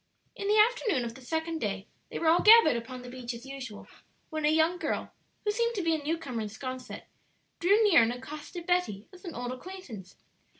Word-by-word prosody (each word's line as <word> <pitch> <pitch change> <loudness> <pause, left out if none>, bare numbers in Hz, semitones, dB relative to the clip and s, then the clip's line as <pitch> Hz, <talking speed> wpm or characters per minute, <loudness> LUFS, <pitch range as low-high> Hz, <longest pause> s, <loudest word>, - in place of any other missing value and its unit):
In 400 - -4
the 420 +1 +4
afternoon 430 - +3
of 230 - -5
the 265 - -13
second 320 +4 -2
day 200 -4 -3 0.2
they - - -5
were 335 - -3
all 335 +2 +5
gathered 440 - +8
upon 250 +2 -6
the 250 - -8
beach 250 -1 -5
as 235 +2 -10
usual, 265 -6 -8 0.4
when 310 -1 -1
a - - +5
young 320 +3 +3
girl, - - -3 0.3
who 420 - +2
seemed 470 +2 0
to 385 - -1
be 330 -1 +2
a 315 - -1
new 315 +3 -1
comer 255 -8 -4
in 215 - -3
'Sconset, 255 +4 -7 0.6
drew 405 +6 +4
near 400 - +7
and 230 +1 +2
accosted 300 +7 -8
Betty 355 - 0
as 370 +2 -14
an 340 - -6
old 245 0 -4
acquaintance. 255 - -9
305 Hz, 215 wpm, -29 LUFS, 245-360 Hz, 0.6 s, gathered